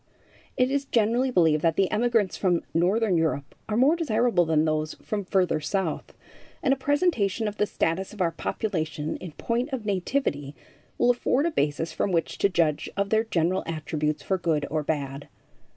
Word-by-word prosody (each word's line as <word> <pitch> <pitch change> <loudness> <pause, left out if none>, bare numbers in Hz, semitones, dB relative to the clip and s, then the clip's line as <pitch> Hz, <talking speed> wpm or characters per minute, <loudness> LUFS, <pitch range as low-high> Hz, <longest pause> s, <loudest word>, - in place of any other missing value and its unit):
It 255 +1 +2
is 280 0 0
generally 240 +2 +2
believed 160 -9 +3
that 165 -1 +2
the 195 0 +1
emigrants 225 -3 +1
from 180 -3 +1
northern 190 +3 +2
Europe 155 -4 -1 0.2
are 215 - 0
more 275 +7 +5
desirable 235 - +2
than 160 -1 +2
those 155 0 -1
from 210 -2 -4
further 185 -4 +1
south, 160 +1 -3 0.5
and 270 -3 +4
a - - +1
presentation 265 - +1
of 210 0 -5
the 210 - +1
status 185 +2 -1
of 215 - -12
our 175 -3 +2
population 160 -7 -3
in 180 -4 -9
point 240 - -2
of 250 -5 -4
nativity 185 - -1 0.4
will 245 - +4
afford 255 +4 +1
a 340 - +1
basis 155 - -1
from 195 - -1
which 165 -2 -1
to 200 - +3
judge 165 -5 +1
of 200 0 -1
their 220 +1 +3
general 180 -2 +1
attributes 155 -1 -2
for 190 -1 -1
good 155 -4 0
or 155 0 0
bad. 145 -2 -3
185 Hz, 180 wpm, -26 LUFS, 160-230 Hz, 0.5 s, more